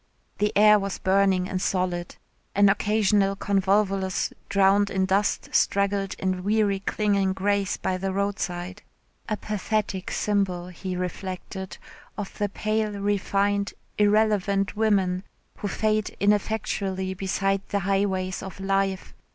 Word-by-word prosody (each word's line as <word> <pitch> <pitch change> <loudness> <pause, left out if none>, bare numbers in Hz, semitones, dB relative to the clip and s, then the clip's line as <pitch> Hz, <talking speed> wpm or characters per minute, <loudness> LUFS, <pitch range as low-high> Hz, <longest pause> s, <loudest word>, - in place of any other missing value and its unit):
The 210 0 +2
air 210 0 +7
was 200 -1 -3
burning 190 -1 +2
and 185 -1 -3
solid. 180 -2 -1 0.4
An 200 0 +6
occasional 205 -1 +2
convolvulus 195 -1 +1 0.2
drowned 200 +1 +4
in 190 -1 +1
dust 195 +2 0
straggled 200 0 +1
in 185 -1 -2
weary 205 -1 +2
clinging 200 -1 +1
grace 200 0 0
by 185 - -1
the 190 +1 -2
roadside 190 -1 -3 0.5
a 215 - 0
pathetic 210 -2 -2
symbol, 190 -4 -1
he 185 +1 -5
reflected, 185 +1 -5 0.4
of 205 -2 -5
the 205 -1 0
pale 215 +1 -1
refined 200 0 0 0.2
irrelevant 205 -2 +2
women 195 -4 +2 0.4
who 205 - -3
fade 215 +1 -1
ineffectually 200 -2 0
beside 195 +1 0
the 200 - 0
highways 190 -1 0
of 190 0 -8
life. 195 -1 -1
195 Hz, 120 wpm, -25 LUFS, 190-205 Hz, 0.5 s, air